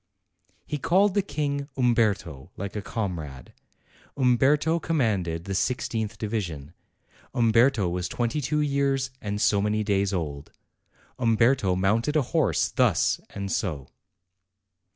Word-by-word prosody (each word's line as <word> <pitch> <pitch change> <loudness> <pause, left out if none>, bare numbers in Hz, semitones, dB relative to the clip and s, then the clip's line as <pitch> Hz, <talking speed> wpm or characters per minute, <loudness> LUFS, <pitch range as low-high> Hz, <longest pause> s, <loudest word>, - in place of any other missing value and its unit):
He 150 - -4
called 185 +6 +3
the 200 - +2
King 145 -4 -3
"Umberto," 105 - +1
like 100 +2 -5
a 105 - -2
comrade. 85 - -5 0.6
Umberto 140 +6 +3
commanded 100 - -1
the 100 - -4
i6th 110 0 -1
division; 90 -9 -4 0.6
Umberto 115 -2 +3
was 90 +1 -2
twenty 120 +5 -1
two 150 +3 0
years 140 -2 0
and 105 0 -3
so 100 -1 +3
many 105 +1 0
days 100 -1 +1
old; 75 -6 -4 0.7
Umberto 115 -4 +3
mounted 110 +10 +1
a 150 - +3
horse 130 - +2
thus - - +2
and 100 -1 -3
o. 75 -9 -5
110 Hz, 120 wpm, -26 LUFS, 95-135 Hz, 0.7 s, called